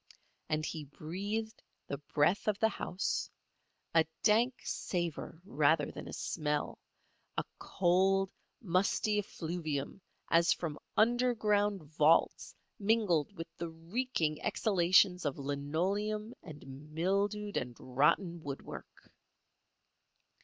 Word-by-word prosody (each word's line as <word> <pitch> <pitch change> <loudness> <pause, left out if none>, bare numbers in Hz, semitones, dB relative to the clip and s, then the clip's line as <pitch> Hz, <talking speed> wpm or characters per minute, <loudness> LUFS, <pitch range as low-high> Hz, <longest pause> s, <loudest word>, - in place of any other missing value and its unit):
And 155 0 0
he 155 -2 -4
breathed 200 +10 -4 0.2
the 140 - -4
breath 150 +7 +1
of 210 -2 +2
the 220 +1 +3
house—a 180 -4 -2 0.2
dank 235 +4 +4
savour 170 -3 -3
rather 150 -2 +2
than - - -8
a - - -7
smell—a 150 -2 -4 0.2
cold, 190 +1 +2 0.3
musty 200 +3 +2
effluvium 165 -4 -4 0.3
as 170 0 +5
from 155 -4 -5 0.2
underground 215 -5 +3
vaults 155 +2 +2 0.2
mingled 200 -8 +2
with 165 - -8
the 170 0 -4
reeking 165 -1 -2
exhalations 185 -2 +3
of 145 -3 -1
linoleum 185 - -1
and 150 -3 -11 0.3
mildewed 200 +4 0
and 120 -1 -3
rotten 160 +7 +1
woodwork. 140 -2 -8
175 Hz, 95 wpm, -33 LUFS, 155-205 Hz, 0.3 s, as